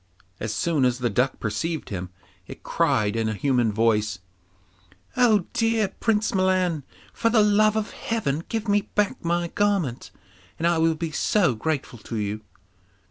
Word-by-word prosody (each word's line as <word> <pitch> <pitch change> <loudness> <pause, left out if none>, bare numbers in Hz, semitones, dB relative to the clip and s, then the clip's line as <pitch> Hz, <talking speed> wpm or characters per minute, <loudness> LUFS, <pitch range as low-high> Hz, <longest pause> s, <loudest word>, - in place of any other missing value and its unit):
As 110 - -3
soon 155 +5 0
as 125 -1 +2
the 120 -2 -1
duck 125 +6 0
perceived 145 +9 -3
him, 95 -2 -5 0.4
it - - -11
cried 105 0 +1
in 115 -1 0
a 110 - -2
human 125 -2 +1
voice, 105 -2 +1 1.0
'Oh, 220 -7 +4
dear 225 -3 +1
Prince 215 -2 0
Milan, 185 -4 +1 0.3
for 230 - +1
the 220 -2 +4
love 210 +1 +4
of 220 -1 -2
Heaven 165 -10 -2
give 225 -1 -3
me 205 0 +1
back 210 -1 0
my 170 0 0
garment, 195 -13 0 0.5
and 165 - -2
I 170 -1 +3
will 165 0 +3
be 160 0 -4
so 175 - +2
grateful 130 0 -3
to 115 - -7
you. 105 0 -3
165 Hz, 160 wpm, -24 LUFS, -, 1.0 s, Oh